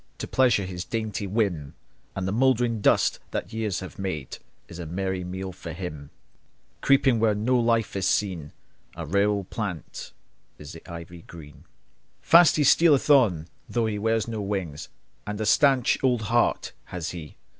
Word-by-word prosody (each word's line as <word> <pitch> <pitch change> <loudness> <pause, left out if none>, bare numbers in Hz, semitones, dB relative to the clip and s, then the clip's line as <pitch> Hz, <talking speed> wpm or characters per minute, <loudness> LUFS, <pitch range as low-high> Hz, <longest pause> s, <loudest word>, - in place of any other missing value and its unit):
To - - -5
pleasure 120 -7 +2
his 90 -1 -5
dainty 110 -3 -3
whim; 95 -9 -1 0.4
And 95 -1 -3
the - - -1
mouldering 120 -1 +2
dust - - +3
that 95 - -5
years 110 -5 -2
have 95 - -9
made 80 -9 -4 0.3
Is 85 - -10
a 85 - -6
merry 95 +2 -3
meal 95 +1 -5
for 85 -2 -8
him. 75 -5 -7 0.7
Creeping 135 -3 +3
where 110 -2 +2
no 125 +4 +1
life 115 -2 +1
is 95 -1 0
seen, 90 -9 -1 0.4
A 85 - -6
rare 100 +6 +2
old 100 -2 -3
plant 100 - -5 0.5
is 75 -1 -10
the 80 - -11
ivy 85 0 -9
green. 75 -4 -13 0.5
Fast 170 -1 +6
he 150 - +2
stealeth 150 0 +4
on, 100 - +4 0.2
though 120 -1 0
he 105 -2 -2
wears 110 0 0
no 110 -2 -4
wings, 95 -7 -4 0.4
And 105 0 -4
a 110 - -1
staunch 135 +3 +3
old 125 -4 +2
heart 120 +3 +1
has 85 -2 -5
he! 80 -4 -9
100 Hz, 165 wpm, -25 LUFS, 85-115 Hz, 0.7 s, Fast